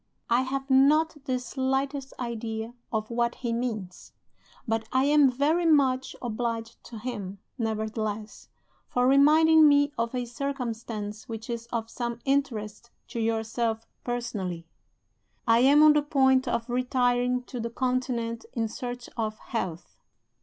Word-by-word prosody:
I 240 +2 +5
have 270 +1 -3
not 295 +4 +4
the 255 -2 0
slightest 270 +2 -2
idea 230 -1 -4 0.2
of 220 0 -2
what 235 0 0
he 235 -2 -3
means; 220 -7 -4 0.5
but 225 0 -1
I 260 +1 +3
am 290 -1 +5
very 300 +7 +1
much 265 -4 +3
obliged 230 -1 -3
to 230 - -9
him, 210 -4 -5 0.2
nevertheless, 220 -1 -3 0.4
for 245 0 +1
reminding 310 +3 +6
me 285 0 +4
of 230 +2 -1
a 250 -1 -1
circumstance 230 -5 -5
which 225 +1 -5
is 235 0 -5
of 230 -1 -3
some 235 0 -4
interest 235 -5 -1 0.2
to 235 0 -4
yourself 225 0 -1 0.2
personally. 210 -9 -3 0.8
"I 230 0 +5
am 280 +4 +6
on 305 -1 +8
the 300 - +3
point 265 -3 +3
of 230 0 -1
retiring 250 0 +1
to 245 0 -7
the 235 0 -3
Continent 240 -2 -1
in 225 -2 -1
search 245 +1 -6
of 215 -2 -2
health. 180 -7 -5
240 Hz, 140 wpm, -27 LUFS, 225-265 Hz, 0.8 s, on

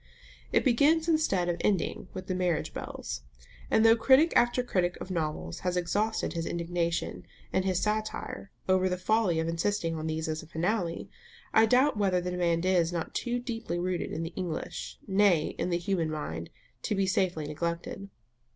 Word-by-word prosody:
It - - +2
begins 295 +6 +4
instead 310 - +2
of 175 -1 0
ending 190 -2 0
with 185 - -7
the 185 - -2
marriage 180 -4 0
bells; - - -5 0.5
and 220 - +4
though 225 0 +8
critic 265 +8 +5
after 240 +1 +4
critic 180 -7 0
of 190 - -7
novels 150 - -3
has 180 0 -1
exhausted 205 +5 0
his 165 -1 -3
indignation 170 0 -2 0.3
and 190 - +1
his 185 -2 +1
satire 215 -1 -2 0.2
over 185 0 +3
the 180 - -1
folly 190 -3 +2
of 160 - -1
insisting 170 +1 0
on 160 0 -3
these 160 0 -2
as 155 0 -2
a 160 - -13
finale, 170 +1 -1 0.5
I 220 0 +6
doubt 255 +2 +4
whether 190 -3 +2
the 180 0 -3
demand 175 -1 +1
is 180 -3 +3
not 170 -2 -3
too 240 0 -1
deeply 230 -7 -4
rooted 180 0 -2
in 160 - -3
the 165 +1 -5
English, 180 -4 -4
nay, 190 -5 +3
in - - 0
the 170 - +1
human 175 -2 -1
mind, 85 - -4 0.3
to 210 - -1
be 195 0 +2
safely 185 -4 0
neglected. 170 +5 -4
180 Hz, 180 wpm, -29 LUFS, 165-210 Hz, 0.5 s, though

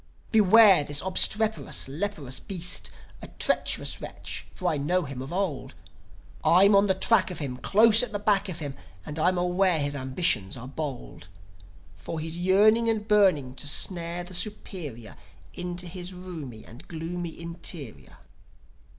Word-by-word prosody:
"Beware 210 -4 +6
this 145 0 -1
obstreperous, 215 +2 +2
leprous 145 -3 -3
beast 180 -4 -2 0.3
A - - -8
treacherous - - -1
wretch, - - -6
for 180 - -3
I 160 - +1
know 175 +6 0
him 135 -3 -7
of 135 +4 -7
old. 180 -6 -3 0.7
I'm 195 +4 +6
on 200 +1 +5
the 190 - +2
track 195 0 +3
of 180 - -6
him, 135 -4 -5
Close 215 - +5
at 250 - -3
the 205 - -2
back 205 -1 +1
of 170 - -5
him, 145 -4 -5 0.3
And 150 +1 -6
I'm 180 +3 +2
aware 180 -1 +2
his 145 0 -2
ambitions 130 - -1
are 125 +1 -8
bold; 130 - -7 0.7
For 160 - -6
he's 160 +1 -4
yearning 210 +6 +4
and 215 -2 -1
burning 185 - +3
to 145 - -5
snare 170 +3 -1
the 180 +1 -10
superior 170 - -5 0.4
Into 180 0 -4
his 180 +1 -7
roomy 160 -11 -9
and 120 +3 -14
gloomy 170 +1 -6
interior." 170 - -7
175 Hz, 150 wpm, -26 LUFS, 145-195 Hz, 0.7 s, Beware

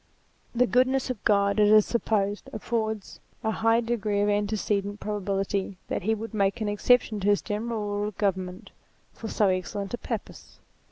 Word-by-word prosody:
The 250 +1 +4
goodness 255 +1 +2
of 235 - -7
God, 200 -1 +3
it 210 - +6
is 215 0 +6
supposed, 205 -3 -1
affords 220 -2 -3 0.2
a 220 - +1
high 225 +1 +2
degree 220 -3 -1
of 205 - +2
antecedent 205 0 -1
probability 195 -2 -2
that - - -1
he 220 +4 +1
would 225 +1 -7
make 200 +1 +1
an 215 - -1
exception 215 +1 +2
to 195 - -2
his 205 -1 +3
general 215 +1 -3
rule 205 0 -1
of 210 - -8
govern 190 -3 +1
ment, 180 +1 -11 0.4
for 225 - -7
so 210 -2 +2
excellent 190 +2 -3
a 240 - -2
purpose. - - -6
210 Hz, 175 wpm, -27 LUFS, 200-225 Hz, 0.4 s, it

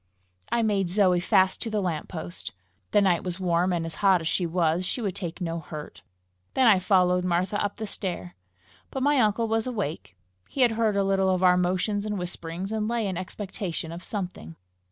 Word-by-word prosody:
I 235 - +2
made 200 -4 +1
Zoe 185 -2 +3
fast 185 +1 +3
to 230 - -2
the 215 -1 0
lamp 170 -6 -2
post: 90 +4 -6 0.4
the 205 - +4
night 180 -4 +2
was 180 0 -4
warm, 180 0 +2
and 170 -2 -1
hot 195 -3 +4
as 160 - -3
she 175 +1 +1
was, 170 0 +1
she 185 - -2
would 200 -6 -2
take 175 -2 -5
no 170 -2 -2
hurt. 155 -1 -9 0.5
Then 260 - +4
I 210 -5 +6
followed 180 -1 +3
Martha 180 +3 0
up 205 0 -2
the 220 - -4
stair. 175 - -5 0.5
But 265 - -3
my 290 0 +4
uncle 225 0 +2
was 225 +1 0
awake. 165 - -4 0.3
He 275 - -2
had 245 -2 +5
heard 225 -2 +1
a 200 - +2
little 195 -1 +2
of 185 0 +1
our 180 -1 +6
motions 185 +4 0
and 210 -1 -2
whisperings, 180 +1 -5
and 215 -1 -1
lay 235 -1 0
in 190 -2 -2
expectation 185 -2 -5
of 170 +2 -8
something. 180 - -5
185 Hz, 200 wpm, -26 LUFS, 175-210 Hz, 0.5 s, I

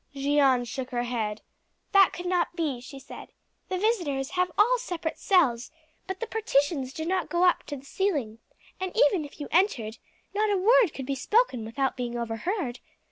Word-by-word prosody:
Jeanne 275 -3 +3
shook 250 +3 -5
her 240 -2 -1
head. 220 -4 -3 0.5
"That 395 -2 +6
could 355 - -7
not 355 -1 0
be," 295 -8 -2
she 275 +2 -10
said. 270 - -11 0.4
"The 370 - -1
visitors 345 - 0
have 360 -1 0
all 480 +5 +4
separate 335 -7 -4
cells, 255 - +2 0.4
but 380 0 -4
the - - -2
partitions 290 - 0
do 315 +3 -5
not 365 +1 -1
go 350 +1 +2
up 360 - +4
to 290 - -4
the 270 - -14
ceiling; 280 - -1 0.4
and 375 -1 -3
even 390 -9 +4
if 290 - -13
you 290 - -5
entered, 270 - +1 0.3
not 425 +1 +1
a 405 - +2
word 445 0 +5
could 265 - -5
be 275 - -2
spoken 280 - +1
without 265 +4 -1
being 240 -1 -3
overheard. 240 - -3
300 Hz, 185 wpm, -27 LUFS, 255-375 Hz, 0.5 s, That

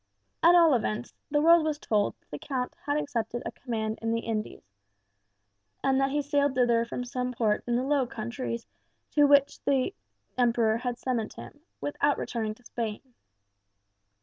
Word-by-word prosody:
At 340 +1 +7
all 335 -4 +6
events, 230 -1 -1 0.2
the 295 0 +2
world 335 0 +7
was 310 -1 -1
told 210 -8 0
that - - -41
the 150 - -5
Count 255 -3 -3
had 290 +1 +1
accepted 240 -5 -2
a - - -3
command 220 -3 -4
in 225 0 -1
the 230 0 0
Indies, 220 -2 -4 1.2
and 270 0 +3
that 270 - +2
he 290 +1 0
sailed 285 -1 +1
thither 240 -2 +3
from 245 +1 -5
some 250 0 -3
port 220 -3 +1
in 240 - +1
the 250 - +1
Low 275 -2 +1
Countries 235 0 -4 0.5
to 295 -1 +5
which 280 -1 +4
the 275 +6 +1 0.5
Emperor 230 -2 +3
had 245 0 -3
summoned 240 -5 -2
him, 290 - -11 0.2
without 290 0 +1
returning 220 -3 -3
to 245 - -24
Spain. 225 -3 -4
250 Hz, 170 wpm, -28 LUFS, 230-285 Hz, 1.2 s, At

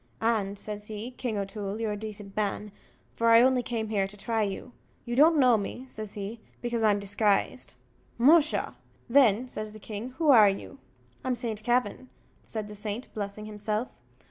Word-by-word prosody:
"And," 210 -3 0
says 210 0 -7
he, 220 +3 -6
"King 245 -3 -3
O'Toole, 200 +1 -4
you're 225 -2 -1
a - - -2
decent 205 -1 -8
man, 210 0 -2 0.4
for 230 0 +2
I 230 +1 +8
only 260 -1 +4
came 230 -3 -3
here 200 -3 +1
to 205 +1 -11
try 225 +2 -1
you. 205 +4 -3 0.3
You 240 -1 -3
don't 310 +4 +6
know 250 -5 +5
me," 245 +5 -6
says 215 -4 -7
he, 210 +3 -5 0.2
"because 240 -1 -2
I'm 210 -2 +3
disguised." 200 0 0 0.4
"Musha! 300 +5 +4 0.3
then," 245 -2 +4
says 215 -3 -5
the 215 - -11
king, 215 +3 -6
"who 315 -3 +4
are 215 -6 +8
you?" 195 +7 -6 0.4
"I'm 255 -1 0
Saint 225 -3 -4
Kavin," 245 +1 0 0.3
said 215 -2 -5
the 210 - -9
saint, 210 +3 -6
blessing 205 0 -5
himself. 215 +2 -3
215 Hz, 175 wpm, -28 LUFS, 205-240 Hz, 0.4 s, I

